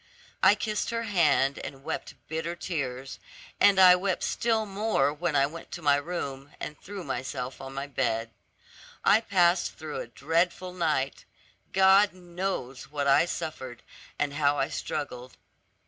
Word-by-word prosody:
I - - +7
kissed 215 -2 -2
her 230 0 -2
hand, 155 -9 +2
and 135 -1 -8
wept - - -5
bitter 160 +2 -3
tears, 135 -7 -4 0.4
and 200 -1 +6
I 180 -1 +9
wept 185 0 -1
still 225 -2 +1
more 200 -8 +1
when 160 0 -2
I 140 -1 +5
went 165 +4 -8
to 175 - -6
my 145 -1 +5
room, 145 -3 -5
and 150 - -5
threw 200 -1 -7
myself 130 -1 -4
on 135 0 -8
the 140 +1 -4
bed. 115 -5 -1 0.7
I 220 - +6
passed 180 -4 +2
through 155 -1 -5
a - - -7
dreadful 170 +8 -1
night; 155 -6 -1 0.5
God 195 +1 +5
knows 175 -8 -5
what 145 -1 -2
I 140 +4 +5
suffered, 130 -7 -5 0.3
and 145 -1 -1
how 145 -1 +2
I - - 0
struggled. 125 -4 -5
155 Hz, 150 wpm, -28 LUFS, 135-185 Hz, 0.7 s, I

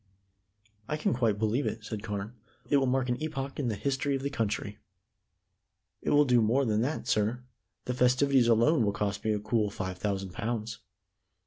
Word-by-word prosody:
"I 150 - -1
can 155 - 0
quite 115 -5 +1
believe 110 +6 0
it," 110 -1 -4
said 110 -2 -5
Carne. 105 0 -4 0.4
"It 145 - +6
will 135 -1 +2
mark 130 0 +1
an 125 +3 -1
epoch 140 -3 -4
in 135 - 0
the 110 - -1
history 140 +5 -1
of 135 - -4
the 140 - -2
country." 110 -4 -2 1.2
"It - - -2
will 145 0 +5
do 125 -3 +4
more 125 +6 +2
than 110 -1 +1
that, 145 +6 -2
sir. 110 +4 0 0.4
The 125 - -1
festivities 125 +1 +3
alone 120 +5 +4
will 100 -1 +1
cost 100 0 -2
me 110 - +1
a 105 - 0
cool 110 0 0
five 95 -2 -5
thousand 95 -2 -2
pounds. 115 0 -3
115 Hz, 190 wpm, -29 LUFS, 105-135 Hz, 1.2 s, It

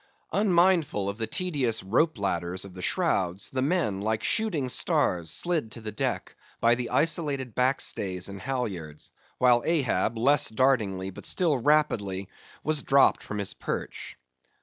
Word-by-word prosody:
Unmindful 175 - +2
of 100 +3 -6
the 110 - -2
tedious 140 - -1
rope 130 - +1
ladders 90 -1 -2
of 95 - -11
the 90 - -9
shrouds, 95 - 0
the 130 - -1
men, 140 - 0
like 110 +1 -1
shooting 205 - +1
stars, 85 -8 +1
slid 160 - -1
to - - -8
the 110 -1 -6
deck, - - -3 0.2
by 115 +1 +4
the 120 0 -2
isolated 145 -7 0
backstays 105 -8 -1
and 100 -1 -8
halyards; 100 - -4 0.3
while 120 -1 +4
Ahab, 125 - 0
less 140 +6 +4
dartingly, 110 -6 +1
but - - -4
still 170 -5 +2
rapidly 115 -9 +1 0.4
was 155 -1 +1
dropped 135 0 +4
from 105 - -6
his 100 -2 -2
perch. - - -6
120 Hz, 150 wpm, -27 LUFS, 100-150 Hz, 0.4 s, by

